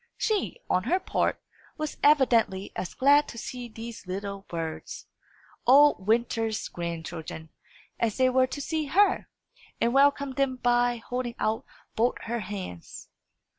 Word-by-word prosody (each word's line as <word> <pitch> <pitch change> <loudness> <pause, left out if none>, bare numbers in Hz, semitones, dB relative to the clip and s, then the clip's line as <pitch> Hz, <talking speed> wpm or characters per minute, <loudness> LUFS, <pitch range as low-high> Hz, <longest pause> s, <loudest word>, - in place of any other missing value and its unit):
She, 430 +1 0
on 185 - +1
her 365 +3 +2
part, - - 0 0.4
was 305 -1 -4
evidently 235 -9 +3
as 185 - -5
glad 285 +2 +5
to - - -9
see 245 +1 -6
these 230 -3 -9
little 200 +1 -5
birds, 165 -2 -5 0.6
old 275 -6 +6
Winter's 225 -1 +1
grandchildren, 165 -2 -6 0.5
as 225 -3 0
they 260 -1 +4
were 255 0 +3
to 285 +3 -5
see 315 +1 -2
her, 385 +8 +2 0.5
and 235 - +2
welcomed 280 0 +3
them 275 -2 +1
by 245 -1 +2
holding 240 +1 -4
out 220 +1 -1 0.3
both 235 +3 +2
her 235 +1 -2
hands. 190 - -7
240 Hz, 135 wpm, -27 LUFS, 200-275 Hz, 0.6 s, old